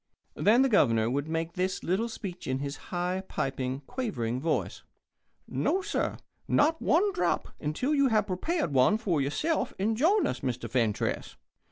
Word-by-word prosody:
Then 230 +6 +4
the - - +4
Governor 115 - +3
would 140 +3 -1
make 165 +1 -2
this 185 +1 -2
little 200 +7 0
speech 190 -5 -7
in 130 0 0
his 140 +1 -4
high, 180 +1 -1
piping, 130 0 -2
quavering 130 - -3
voice: 160 +1 -1 0.7
"No, 380 +1 0
sir 415 - -1 0.3
not 320 +2 +3
one 390 +6 +3
drop 175 - 0
until 160 - -1
you 280 -2 +4
have 215 -4 +2
prepared 245 - -1
one 135 +11 +4
for 180 -10 0
yourself 300 - -1
and 215 +4 +1
join 365 - +3
us, - - -2
Mr. 125 -1 -3
Fentress. 115 -5 -1
180 Hz, 160 wpm, -29 LUFS, -, 0.7 s, Then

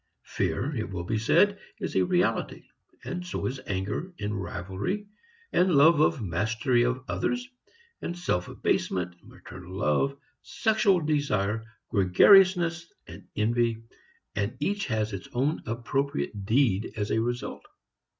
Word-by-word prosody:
Fear, 145 +3 -2
it 110 -4 -3
will 90 -3 -4
be 110 +5 -1
said, 200 - +3 0.2
is - - -5
a - - +4
reality, 180 0 0 0.4
and 180 0 -4
so 180 - -4
is 130 0 -3
anger, 105 - -3
and 105 -1 -2
rivalry, 95 - -4 0.5
and 180 -2 +3
love 150 +2 +6
of 150 -5 +2
mastery 110 +7 +1
of 125 +1 -1
others, 245 0 -1 0.5
and 175 - -4
self 90 - -1
abasement, 90 -1 -1
maternal 90 0 -11
love, 105 - +1 0.2
sexual 215 -5 +2
desire, 115 -9 0 0.3
gregariousness 170 - +5
and - - -12
envy, 115 +1 +1 0.5
and 105 +5 -2
each 200 +6 -1
has 110 -2 -1
its 95 - -6
own 140 +6 0
appropriate 120 -2 -2
deed 115 -4 +2
as 105 -1 -2
a 110 - +2
result. 120 +1 -4
120 Hz, 130 wpm, -27 LUFS, 105-170 Hz, 0.5 s, love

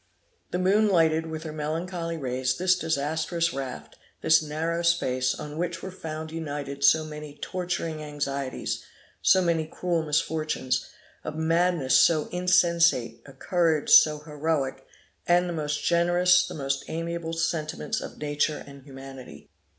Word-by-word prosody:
The - - -2
moon 200 +4 +3
lighted 165 -3 +3
with 160 0 -6
her 160 - -6
melancholy 165 +2 -3
rays 130 -2 -1
this 185 0 +3
disastrous 160 +1 -1
raft, 135 -1 -6 0.2
this 160 0 +5
narrow 160 +3 -2
space, 130 -7 +1
on 150 +1 -7
which 175 0 -3
were 190 - -5
found 160 -3 -6
united 145 -3 -5
so 155 +3 +5
many 150 -1 -9
torturing 175 -3 -3
anxieties, 140 -3 -3 0.4
so 185 - +5
many 165 -2 0
cruel 170 0 -1
misfortunes, 155 -4 -1 0.4
a - - -4
madness 160 -3 +2
so 155 -3 +3
insensate, 170 -10 +2
a 135 - -12
courage 165 +1 0
so 155 -1 +7
heroic, 150 -3 -2 0.4
and 175 +1 +4
the 175 - -3
most 150 -2 -2
generous, 175 +1 +4
the - - -7
most 135 -2 -2
amiable 165 0 -4
sentiments 165 -2 -2
of - - -8
nature 150 0 -1
and 140 -1 -12
humanity. 135 -1 -11
160 Hz, 140 wpm, -26 LUFS, 145-170 Hz, 0.4 s, so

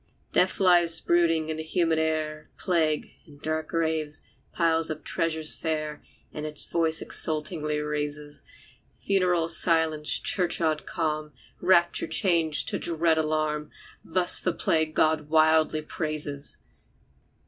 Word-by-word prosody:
Death - - +2
lies 175 -3 +4
brooding 165 -2 +1
in 155 - -3
the - - -4
humid 165 0 0
air, 155 -1 -3
Plague, 160 -4 -1 0.2
in 145 -2 -16
dark 155 +1 -3
graves, 160 -3 -2 0.3
piles 165 -1 +1
up 155 -1 -6
treasures 160 -1 0
fair, 155 -2 -4 0.3
And 150 - -6
its 155 -1 -3
voice 165 -1 +1
exultingly 155 -1 +1
raises. 150 0 -4 0.6
Funeral 180 -4 0
silence 160 -3 +3
churchyard 165 -4 +1
calm, 155 -2 -3 0.3
Rapture 175 -1 +3
change 165 -6 +2
to - - -2
dread 165 -1 +1
alarm. 155 -1 -2 0.3
Thus 180 +1 +3
the 180 - -1
plague 160 -1 0
God 155 -1 +1
wildly 155 0 +3
praises! 150 -3 -4
160 Hz, 120 wpm, -26 LUFS, 155-165 Hz, 0.6 s, lies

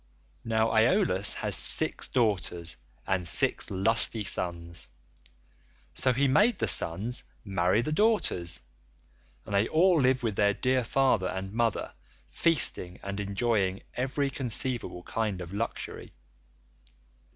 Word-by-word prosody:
Now, 110 0 0
Aeolus 110 - +3
has - - -1
six - - +2
daughters 90 -8 -2 0.3
and 95 -2 -2
six 85 - +3
lusty 110 +3 +1
sons, 85 -4 0 1.0
so 130 - +3
he 135 +3 +1
made 205 - +3
the - - -1
sons 105 +9 +2 0.2
marry 95 +2 0
the 155 - -4
daughters, 155 - 0 0.8
and - - -8
they 100 +2 +2
all 170 0 +3
live 130 0 +1
with 110 -4 -2
their 100 -1 +2
dear 130 0 0
father 120 -6 +1
and 95 +1 -6
mother, 115 -2 -2 0.3
feasting 125 - +2
and 100 +1 -5
enjoying 100 -1 -1
every 135 +2 -2
conceivable 125 -7 -1
kind 105 -3 -3
of 90 +1 -9
luxury. 115 +3 -6
110 Hz, 120 wpm, -27 LUFS, 95-130 Hz, 1.0 s, Aeolus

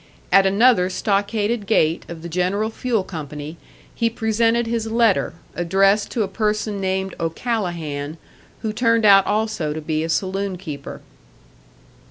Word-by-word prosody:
At 195 +1 +6
another 200 -2 +4
stockaded 205 +2 -1
gate 165 -6 +2
of 165 -1 -8
the - - -5
General 185 +6 -1
Fuel 230 -3 -1
Company 150 -2 -7 0.4
he 230 -1 +1
presented 230 +1 +1
his 230 -1 -2
letter, 225 -7 +2 0.2
addressed 195 +4 +2
to 230 - 0
a - - -2
person 210 0 -1
named 190 0 -1
O'Callahan, 165 - -3 0.5
who 215 -1 -2
turned 230 -1 +2
out 195 -2 +7
also 210 -7 -1
to 155 - -5
be 155 0 -1
a 165 - -3
saloon 190 +2 -1
keeper. 150 -6 -8
195 Hz, 140 wpm, -21 LUFS, 170-220 Hz, 0.5 s, out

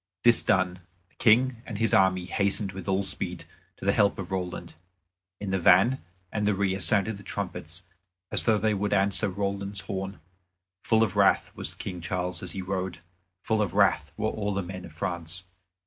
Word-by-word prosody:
This 120 -1 +6
done, 90 -1 +1 0.3
the - - -33
King 120 +1 +4
and 110 -5 -6
his 115 0 +1
army 95 -1 +4
hastened 100 +1 0
with 95 +1 -8
all 95 +1 +1
speed - - -2 0.3
to - - -9
the 100 - +4
help 100 -1 +3
of 95 -1 -6
Roland. 90 -2 -4 0.7
In 100 -2 -4
the 95 - +1
van 95 +9 +5 0.3
and 105 -1 -1
the 105 - +2
rear 95 -1 0
sounded 100 +4 +1
the 100 - -12
trumpets 90 -3 -5 0.5
as - - +1
though 110 -2 +4
they 110 +1 +1
would 105 0 -1
answer 100 +1 +3
Roland's 100 +1 -2
horn. 95 -2 -5 0.7
Full 110 -1 +4
of 100 -5 -1
wrath - - +3
was - - -3
King 90 -1 -6
Charles 90 -1 -2
as - - -3
he 95 - -4
rode; 95 -1 -3 0.5
full 110 -1 +1
of 100 -6 -1
wrath 75 -1 +3
were 110 - 0
all 105 -2 -2
the 100 - -1
men 90 0 -7
of 85 - -12
France. 85 0 -3
95 Hz, 190 wpm, -27 LUFS, 90-105 Hz, 0.7 s, This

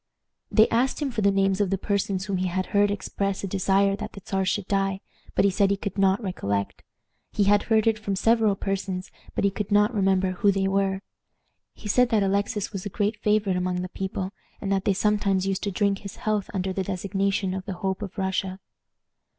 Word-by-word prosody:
They 220 0 +5
asked 250 +4 +1
him 290 -3 -1
for 230 - -2
the 200 - +4
names 195 0 +2
of 200 - +1
the 195 - +1
persons 195 -1 -1
whom 195 -2 -1
he 185 0 0
had 185 +1 -1
heard 205 0 +4
express 200 0 -2
a - - -1
desire 195 +1 +2
that 215 +1 -6
the 200 - -10
Czar 190 -1 0
should 190 +1 0
die, 195 -1 0 0.4
but - - +4
he 200 - +4
said 200 +1 +2
he 200 - +1
could 200 0 -5
not 195 +3 +3
recollect. 100 - -2 0.5
He 205 - +1
had 205 +1 +4
heard 220 -1 +4
it 225 -1 +2
from 200 -2 -2
several 225 0 +3
persons, 190 -1 -3 0.2
but - - 0
he 200 - +3
could 205 +1 -4
not 210 +3 +4
remember 190 -2 +2
who 200 +2 +3
they 195 0 0
were. 195 0 0 0.7
He - - -9
said 250 +4 +3
that 220 -4 +3
Alexis 200 +2 -1
was 190 -2 -4
a 205 - -4
great 210 +2 -1
favorite 210 -3 +2
among 180 0 -1
the 185 - -5
people, 190 0 -4 0.3
and 195 - -3
that 195 -1 +1
they 200 - +3
sometimes 200 -1 +1
used 195 0 -1
to 200 - -1
drink 200 +1 +1
his 200 -2 -8
health 210 -2 -1
under 190 -1 -2
the 190 - -1
designation 195 0 -1
of 190 0 -5
the 195 - -4
Hope 190 +1 -1
of 200 0 -7
Russia. 190 0 -1
195 Hz, 220 wpm, -25 LUFS, 190-205 Hz, 0.7 s, They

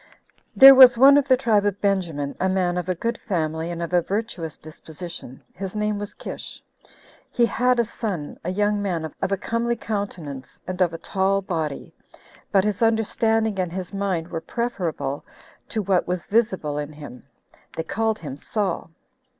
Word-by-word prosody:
1. - - -12
Ther 270 0 +13
was 260 -2 +9
one 275 +3 +8
of 285 -1 +3
the 260 -1 +5
tribe 220 -5 +2
of 205 -1 -1
Benjamin, 170 -8 -1
a 190 - +1
man 185 -2 +1
of 180 0 -3
a 185 - +1
good 230 +6 -3
family, 160 -3 -2
and 170 0 -4
of 170 - -5
a 175 - +4
virtuous 190 -5 -4
disposition; 155 -3 -9
his 190 +2 -6
name 210 -1 -1
was 205 0 -6
Kish. - - -8 0.7
He 240 - +2
had 250 +1 +1
a - - +5
son, 205 -9 -5
a 175 - -3
young 205 +2 +1
man 175 -5 -2 0.2
of - - -1
a 195 - +1
comely 230 +4 -1
countenance, 180 - -5
and 185 0 -4
of 175 -2 +3
a 165 - -6
tall 195 +2 0
body, 160 -6 -4 0.6
but 195 -1 +4
his 210 0 -1
understanding 225 -1 +1
and 180 -2 -1
his 185 +1 -6
mind 190 -4 -2
were 165 - -4
preferable 170 - -3 0.5
to 215 - -2
what 185 -2 +1
was 180 -1 -2
visible 190 -10 0
in 150 +1 -5
him: 145 -4 -11 0.5
they 160 - -1
called 225 +4 -1
him 145 -8 -7
Saul. 200 +1 -2
190 Hz, 180 wpm, -23 LUFS, 165-220 Hz, 0.7 s, Ther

